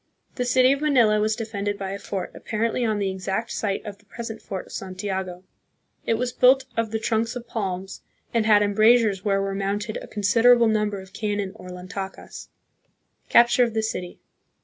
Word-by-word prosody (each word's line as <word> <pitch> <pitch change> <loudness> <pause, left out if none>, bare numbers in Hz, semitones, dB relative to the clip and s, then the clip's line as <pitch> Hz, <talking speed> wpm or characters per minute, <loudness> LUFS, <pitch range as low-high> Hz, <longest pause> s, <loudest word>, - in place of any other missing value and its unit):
The 250 - -2
city 255 +1 +4
of 280 +1 0
Manila 240 -8 +4
was 215 +1 +1
defended 205 -3 -3
by 195 -1 -4
a 200 - -5
fort, 195 -1 -5
apparently 230 +3 -2
on 220 -2 +1
the 200 -2 -1
exact 190 +5 -3
site 200 0 -2
of 200 -2 -8
the 210 - -26
present 225 +1 -7
fort 190 -2 -6
of - - -16
Santiago. 190 -1 -5 0.6
It 225 - +3
was 245 +1 -2
built 260 +1 +5
of 230 -1 0
the 220 - -1
trunks 225 +1 -1
of 245 -1 -7
palms, 190 -4 -4 0.3
and 225 -2 +1
had 210 -1 +6
embrasures 215 -1 +3
where 195 -1 +1
were 195 0 -2
mounted 200 +2 -2
a - - -8
considerable 230 +3 +4
number 210 -2 0
of 190 0 -13
cannon, 205 -2 -2
or 185 -3 -12
lantakas. 185 +2 -7 0.8
Capture 240 +1 +5
of 230 -2 -2
the 220 - +1
City. 180 -5 -4
210 Hz, 185 wpm, -24 LUFS, 195-230 Hz, 0.8 s, had